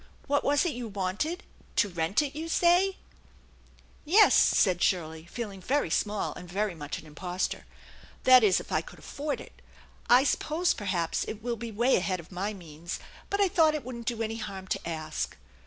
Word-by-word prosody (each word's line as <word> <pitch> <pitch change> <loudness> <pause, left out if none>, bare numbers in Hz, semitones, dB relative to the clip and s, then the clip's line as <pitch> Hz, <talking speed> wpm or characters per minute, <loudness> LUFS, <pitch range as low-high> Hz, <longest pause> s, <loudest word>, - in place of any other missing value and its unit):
What 285 0 +1
was 290 +3 +3
it 345 - +1
you 240 -1 -5
wanted? 205 - -2 0.3
To 210 - +3
rent 175 - 0
it, 285 -1 -5
you 320 +2 -4
say? 360 +3 +3 0.3
" - - -29
" - - -28 0.2
Yes," 390 +8 +6
said 180 -2 +4
Shirley, 160 -3 0
feeling 200 -1 -6
very 265 - 0
small 210 +3 0
and 180 - -10
very 200 +1 -1
much 150 -3 -5
an - - -11
impostor; 175 +4 -4 0.6
"that 255 -2 +8
is, 195 -4 +4
if - - -10
I - - +2
could - - -13
afford 290 0 -4
it. - - -13 0.5
I 250 +2 +7
suppose 320 +4 +1
perhaps 185 -5 -1
it 215 0 -6
will 240 -1 -1
be 230 0 -6
way 235 +5 +3
ahead 185 0 -1
of 170 - -12
my 190 +3 -2
means, 170 -3 -7 0.3
but 400 - -1
I 400 - +5
thought 325 -4 +3
it 300 - -4
wouldn't 235 -2 -7
do 230 -2 -1
any 225 0 -3
harm 195 -4 -6
to - - -2
ask." 155 - -4
215 Hz, 195 wpm, -28 LUFS, 180-285 Hz, 0.6 s, that